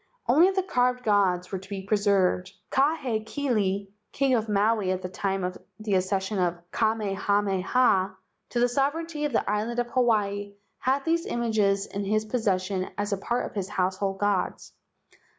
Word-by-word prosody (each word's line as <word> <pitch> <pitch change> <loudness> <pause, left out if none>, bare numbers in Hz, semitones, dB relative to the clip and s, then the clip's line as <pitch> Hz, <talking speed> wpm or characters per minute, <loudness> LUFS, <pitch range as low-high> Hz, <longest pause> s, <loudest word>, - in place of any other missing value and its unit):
Only 315 +10 +6
the 380 -1 0
carved 250 -7 +1
gods 190 -4 +2
were 190 - -2
to 190 +1 -14
be 195 -2 -5
preserved. 195 -2 +1 0.2
Kahekili, 235 -7 0 0.2
king 275 -1 +1
of 225 -2 +1
Maui 210 -1 +2
at 185 0 -2
the 180 - -3
time 195 0 -2
of 180 0 -3 0.2
the 215 -1 -2
accession 190 +2 0
of 175 -1 +1
Kamehameha 200 -1 +1 0.3
to 240 - -1
the 245 - +4
sovereignty 295 +4 -1
of 295 - -1
the 230 - 0
island 215 +3 -1 0.2
Hawaii, 205 -5 +1 0.3
had 270 +2 0
these 335 +1 +1
images 215 -4 +1
in 200 - -4
his 215 +2 0
pos¬ 245 +3 -1
session 185 -1 0
as 205 0 -1
a - - 0
part 240 +5 -1
of - - -8
his 195 -2 -3
household 190 0 -1
gods. 200 -2 -1
205 Hz, 160 wpm, -26 LUFS, 195-245 Hz, 0.3 s, Only